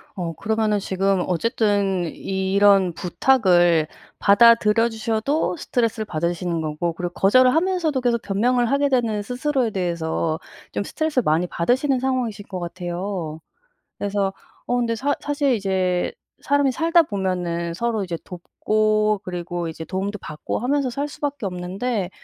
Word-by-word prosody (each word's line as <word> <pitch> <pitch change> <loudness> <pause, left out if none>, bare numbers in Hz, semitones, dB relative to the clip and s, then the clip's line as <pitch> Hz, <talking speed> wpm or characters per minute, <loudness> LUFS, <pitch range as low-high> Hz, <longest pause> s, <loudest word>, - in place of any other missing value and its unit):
어 170 -3 -3
그러면은 215 +2 0
지금 195 -1 0
어쨌든 200 -2 +1
이런 195 -1 +2
부탁을 175 -4 +3 0.3
받아들여 225 +1 +5
주셔도 225 +6 -1
스트레스를 230 -6 -1
받으시는 170 -1 -2
거고 155 +2 -2
그리고 175 +1 -5
거절을 255 +8 +4
하면서도 330 -5 +1
계속 235 -2 +1
변명을 240 +5 +1
하게 280 +1 +2
되는 230 -5 +1
스스로에 250 +2 -1
대해서 165 -3 -1 0.3
좀 - - -2
스트레스를 310 +2 -1
많이 160 +2 +2
받으시는 255 - +1
상황이신 250 -6 -2
것 185 - -5
같아요. 175 -1 -4 0.6
그래서 200 -1 -1 0.3
어 245 - 0
근데 235 -2 0
사 275 +5 0
사실 285 -2 +1
이제 190 -4 0 0.3
사람이 285 -1 +2
살다 335 +5 +4
보면은 180 - -2
서로 225 +1 -1
이제 175 -2 -4
돕고 215 +3 0
그리고 175 -1 -4
이제 160 0 -7
도움도 195 +4 -3
받고 150 -1 -4
하면서 275 +2 0
살 280 +4 -3
수 - - -12
밖에 285 -6 -2
없는데 190 +3 -3
205 Hz, 335 characters per minute, -22 LUFS, 180-245 Hz, 0.6 s, 받아들여